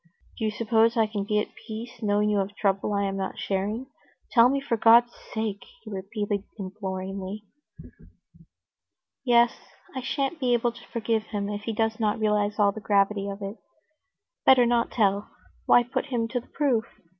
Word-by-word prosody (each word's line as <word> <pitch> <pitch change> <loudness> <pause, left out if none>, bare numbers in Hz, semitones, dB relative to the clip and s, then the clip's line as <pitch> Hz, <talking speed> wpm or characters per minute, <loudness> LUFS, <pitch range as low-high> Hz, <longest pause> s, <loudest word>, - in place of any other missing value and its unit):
Do 220 - -1
you - - +2
suppose 225 +2 +2
I 225 - +4
can 210 -2 -3
be 210 +1 0
at 210 - -1
peace, 230 +2 -9
knowing 210 -1 +2
you 205 - +2
have 195 0 -1
a - - -21
trouble 195 0 0
I 200 -1 +1
am 195 0 -2
not 195 - -4
sharing? 205 +6 -2 0.5
Tell 235 0 +6
me, 275 +1 +1
for 275 -4 -1
God's 235 +2 +6 0.2
sake," 220 -3 -3 0.2
he - - -9
repeated 200 +1 -3
imploringly. 195 0 -5 1.8
"Yes, 240 -2 +4 0.4
I 260 - -2
shan't 275 +4 -2
be 250 -3 +2
able 240 0 +1
to 240 +1 -15
forgive 225 -2 -1
him 205 -2 -3
if 205 0 -5
he 225 - -2
does 220 +1 0
not 215 -2 +1
realize 210 -1 +1
all 205 -2 +4
the 220 - -8
gravity 200 0 +1
of 200 +1 -6
it. 200 +3 -5 0.9
Better 255 -2 +6
not 235 0 +2
tell; 200 -2 +1 0.4
why 245 - +6
put 245 +4 -3
him 240 -4 -1
to 245 - -1
the 240 - -16
proof?" 260 -6 +1
215 Hz, 180 wpm, -26 LUFS, 200-235 Hz, 1.8 s, Tell